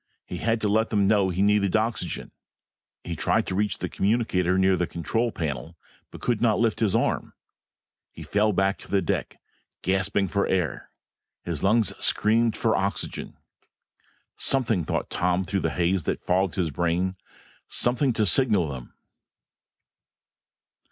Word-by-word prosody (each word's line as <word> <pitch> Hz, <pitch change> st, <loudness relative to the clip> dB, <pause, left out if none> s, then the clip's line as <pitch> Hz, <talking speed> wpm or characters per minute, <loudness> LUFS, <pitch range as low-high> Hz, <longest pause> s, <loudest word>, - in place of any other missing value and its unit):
He 90 Hz, -, -6 dB
had 115 Hz, +5 st, 0 dB
to 105 Hz, -, +1 dB
let 110 Hz, +2 st, +2 dB
them 100 Hz, -3 st, +2 dB
know 100 Hz, -2 st, +3 dB
he 95 Hz, +2 st, 0 dB
needed 100 Hz, -1 st, +2 dB
oxygen. 110 Hz, -5 st, -2 dB, 0.7 s
He -, -, -4 dB
tried -, -, +1 dB
to -, -, -4 dB
reach 105 Hz, +2 st, 0 dB
the -, -, -3 dB
communicator 95 Hz, -4 st, +1 dB
near 95 Hz, 0 st, +4 dB
the 90 Hz, -1 st, -1 dB
control 115 Hz, +9 st, -1 dB
panel 80 Hz, 0 st, -4 dB, 0.3 s
but -, -, -12 dB
could 120 Hz, -3 st, 0 dB
not 115 Hz, -3 st, +3 dB
lift 115 Hz, -2 st, +1 dB
his 110 Hz, -2 st, +1 dB
arm. 115 Hz, -, 0 dB, 0.8 s
He -, -, -10 dB
fell 105 Hz, +1 st, +1 dB
back 95 Hz, 0 st, +1 dB
to -, -, -12 dB
the 100 Hz, -2 st, +1 dB
deck -, -, -3 dB, 0.4 s
gasping 95 Hz, +1 st, +1 dB
for 100 Hz, +2 st, 0 dB
air; 90 Hz, -7 st, -1 dB, 0.5 s
his 85 Hz, -4 st, -3 dB
lungs 110 Hz, +3 st, +2 dB
screaming 115 Hz, +1 st, +2 dB
for 110 Hz, 0 st, +1 dB
oxygen. 100 Hz, +1 st, -3 dB, 1.0 s
Something, 115 Hz, -, +1 dB
thought -, -, -2 dB
Tom 90 Hz, +1 st, 0 dB
through 95 Hz, +2 st, -1 dB
the -, -, 0 dB
haze 90 Hz, 0 st, 0 dB
that -, -, -2 dB
fogged 95 Hz, 0 st, +1 dB
his 85 Hz, -4 st, -1 dB
brain, 85 Hz, +4 st, 0 dB, 0.5 s
something 125 Hz, +2 st, +2 dB
to 110 Hz, -, +1 dB
signal 105 Hz, -, +3 dB
them. 65 Hz, -3 st, -8 dB
100 Hz, 150 wpm, -25 LUFS, 90-110 Hz, 1.0 s, near